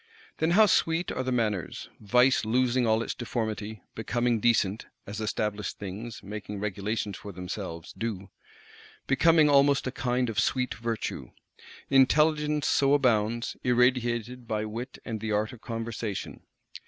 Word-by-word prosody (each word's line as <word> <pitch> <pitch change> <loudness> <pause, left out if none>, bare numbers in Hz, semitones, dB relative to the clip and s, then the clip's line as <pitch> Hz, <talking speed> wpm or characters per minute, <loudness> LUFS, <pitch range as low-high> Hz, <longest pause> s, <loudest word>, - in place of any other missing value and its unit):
Then 160 - +2
how 220 - +8
"sweet" 165 -3 +2
are - - -2
the 130 0 -2
manners; 110 -7 -1
vice 125 +5 +3
"losing 125 +2 +2
all 110 +1 +2
its - - -3
deformity;" 110 -3 -4
becoming 120 +1 0
decent 105 -2 +1 0.2
(as 105 +2 -6
established 105 -1 -2
things, 105 +4 -7
making 105 0 -6
regulations 105 0 -3
for 105 - -8
themselves, 90 -2 -6
do); 100 -4 -4 0.7
becoming 160 +3 +5
almost 140 -1 +4
a 130 - -2
kind 125 -1 0
of 115 - -1
"sweet" 125 -2 +1
virtue! 115 0 -4 0.6
Intelligence 150 +2 +3
so 140 0 +4
abounds; 115 -3 +1
irradiated 125 -1 +1
by 110 -1 -1
wit 115 +4 -6
and 110 -2 -4
the 110 0 -3
art 105 +4 0
of 120 - -13
conversation. 115 -3 -5
115 Hz, 140 wpm, -28 LUFS, 105-130 Hz, 0.7 s, how